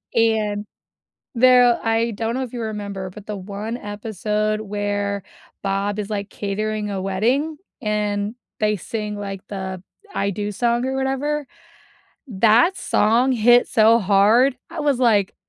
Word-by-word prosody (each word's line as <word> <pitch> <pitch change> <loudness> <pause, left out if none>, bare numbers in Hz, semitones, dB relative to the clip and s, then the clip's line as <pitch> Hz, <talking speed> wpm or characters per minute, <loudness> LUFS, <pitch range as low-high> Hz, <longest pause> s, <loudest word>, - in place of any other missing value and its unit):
and 215 -2 +1 0.7
there 245 -1 +6
I 225 +1 +1
don't 225 +2 -2
know 265 - -1
if 250 -1 -8
you 240 - -4
remember, 200 -3 -4
but 205 +1 -12
the 210 - -3
one 205 +4 -5
episode 215 0 -2
where 205 -1 -2 0.4
Bob 195 +1 -1
is, 205 - -4
like, 200 -1 -3
catering 210 +1 -3
a 195 -1 -3
wedding, 245 +12 0 0.2
and 210 0 -1 0.2
they 210 0 +2
sing, 210 +2 -4
like, 195 -2 -6
the 190 -2 -5 0.3
"I 200 - 0
Do" 205 +2 -3
song 235 +3 0
or 265 0 -2
whatever, 270 +2 -1 0.8
that 230 - +4
song 240 - +2
hit 240 +1 +5
so 225 -1 +5
hard. 215 +7 +4
I 330 - -5
was 290 -4 +1
like, 210 -6 +3
215 Hz, 145 wpm, -21 LUFS, 205-235 Hz, 0.8 s, there